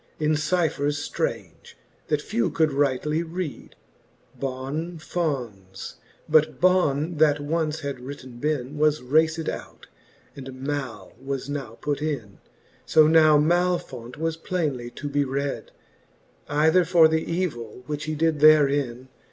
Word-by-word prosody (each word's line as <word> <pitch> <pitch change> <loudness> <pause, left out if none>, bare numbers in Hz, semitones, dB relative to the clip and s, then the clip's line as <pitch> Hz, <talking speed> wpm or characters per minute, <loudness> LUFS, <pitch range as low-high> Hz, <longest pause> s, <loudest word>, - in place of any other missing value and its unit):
In 155 0 +2
cyphers 150 -3 0
ftrange, - - -4 0.3
that - - 0
few 115 - 0
could 160 -3 +1
rightly 145 +3 +1
read, 170 -2 -6 0.6
BON 140 +6 -4
F 160 - -16
O 150 -8 0
N 95 -4 -19
5: - - -7 0.3
but 155 0 +3
Ion 165 -3 +2
that 150 -1 +4
once 155 +1 -1
had 140 -3 -4
written 130 -2 -9
bin>. 145 0 -2
Was 150 -3 +2
raced 155 +4 +2
out, - - -6 0.5
and 130 -1 -9
Mai 130 -9 -4
was 135 0 -4
now 130 -6 -5
put 145 -1 -2
in. 135 -10 -4 0.4
So 155 - +5
now 155 -1 +6
Malfo7it 155 -7 0
was 165 +1 -2
plainely 150 -9 -2
to 145 +4 -7
be 145 0 +1
red 140 +1 -3
j - - -24 0.8
Either 160 +5 +4
for 170 -1 +6
th'evill, 160 -8 -2
which 145 +1 -4
he 155 0 -3
did 160 0 +1
therein 140 -4 +4
150 Hz, 140 wpm, -25 LUFS, 135-160 Hz, 0.8 s, now